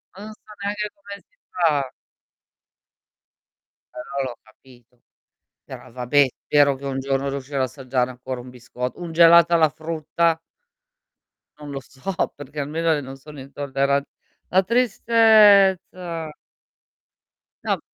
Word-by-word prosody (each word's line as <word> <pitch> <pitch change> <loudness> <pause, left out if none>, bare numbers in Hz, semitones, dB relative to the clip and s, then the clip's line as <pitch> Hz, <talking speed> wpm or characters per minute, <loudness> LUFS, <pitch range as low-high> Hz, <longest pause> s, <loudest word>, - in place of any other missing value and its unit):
ma 200 - -10
non 215 - -8
so - - -24 0.2
neanche 210 +1 -2
come 200 0 -10
si - - -40
fa. 150 -7 +1 2.1
Però 135 +2 -4
l'ho 125 -3 -6
capito. 120 +2 -22 0.7
Però, - - -11
vabbè, 130 +3 +3 0.2
spero 145 -1 +4
che 140 +1 -9
un 135 -1 -3
giorno 135 0 -1
riuscirò 140 0 -4
a - - +3
assaggiare 130 -1 -2
ancora 125 0 -7
un 125 - -11
bisco 125 0 -6
un 175 -2 -7
gelato 170 0 +6
alla 160 -2 +5
frutta. 160 +1 -1 1.2
Non 145 -1 -9
lo 135 - -4
so 140 +10 -7 0.2
perché 145 +1 -9
almeno 160 +3 0
i - - -4
non 135 0 -9
sono 150 +2 -13
intolleran 140 0 -1 0.5
la 190 +1 +3
tristezza. 200 -7 +3 1.3
No - - -1
145 Hz, 125 wpm, -22 LUFS, 135-175 Hz, 2.1 s, gelato